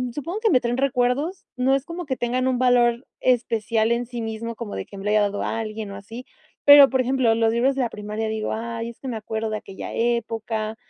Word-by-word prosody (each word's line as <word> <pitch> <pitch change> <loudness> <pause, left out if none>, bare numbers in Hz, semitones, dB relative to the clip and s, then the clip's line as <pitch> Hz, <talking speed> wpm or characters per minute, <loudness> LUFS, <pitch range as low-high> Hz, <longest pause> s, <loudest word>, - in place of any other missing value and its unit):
supongo 335 +8 -4
que 445 -1 +2
me 255 - +5
traen 240 +1 -1
recuerdos, 275 +7 0
no 260 +2 +3
es 275 - -1
como 340 +1 -6
que 260 - -1
tengan 250 +2 0
un 255 -1 +1
valor 245 -1 +3
especial 230 -2 +1
en 240 +1 0
sí 240 -1 -5
mismo, 225 +1 -5
como 220 -2 -6
de 95 - -4
que 200 - -12
me 195 - -8
la 210 - +1
haya 215 0 +4
dado 205 0 -1
a 225 - -2
alguien 215 -2 -5
o 195 - -7
así. 225 +5 -9 0.4
Pero, 285 -1 +10
por 260 -1 +1
ejemplo, 255 -3 +2
los 225 0 +2
libros 260 +3 +2
de 270 - 0
la 235 - -1
primaria, 210 +1 -4
digo: 220 0 -2
"Ay, 230 +1 -4
es 235 - -13
que 270 - -8
me 225 - -3
acuerdo 220 0 -4
de 215 - -1
aquella 195 -2 -8
época", 225 -2 -1
235 Hz, 240 wpm, -23 LUFS, 220-255 Hz, 0.4 s, Pero